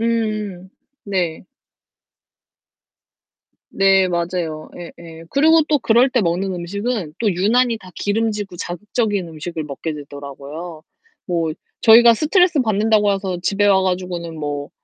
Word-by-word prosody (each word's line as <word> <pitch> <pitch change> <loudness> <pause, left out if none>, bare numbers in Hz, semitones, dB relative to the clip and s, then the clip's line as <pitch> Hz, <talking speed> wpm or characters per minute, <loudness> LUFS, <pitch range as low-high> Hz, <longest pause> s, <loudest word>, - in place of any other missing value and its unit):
음음. 215 -5 -2 0.4
네. 180 -4 -2 2.2
네, 195 -1 +3
맞아요. 170 -3 -3
예예. 165 -1 -11
그리고 315 +3 +5
또 300 -2 +3
그럴 240 +2 +4
때 255 -2 +1
먹는 185 +1 -1
음식은 195 0 -4
또 215 -4 +1
유난히 230 +5 +2
다 185 -3 -14
기름지고 205 -3 -2
자극적인 205 +2 -2
음식을 160 0 -6
먹게 150 +2 -5
되더라고요. 145 +3 -9 0.4
뭐 165 -3 -1 0.3
저희가 235 +1 +7
스트레스받는다고 225 - +2
해서 190 -2 -3
집에 200 +2 +1
와 195 -1 +4
가지고는 180 -3 -3
뭐, 145 -1 -4
190 Hz, 265 characters per minute, -20 LUFS, 170-220 Hz, 2.2 s, 저희가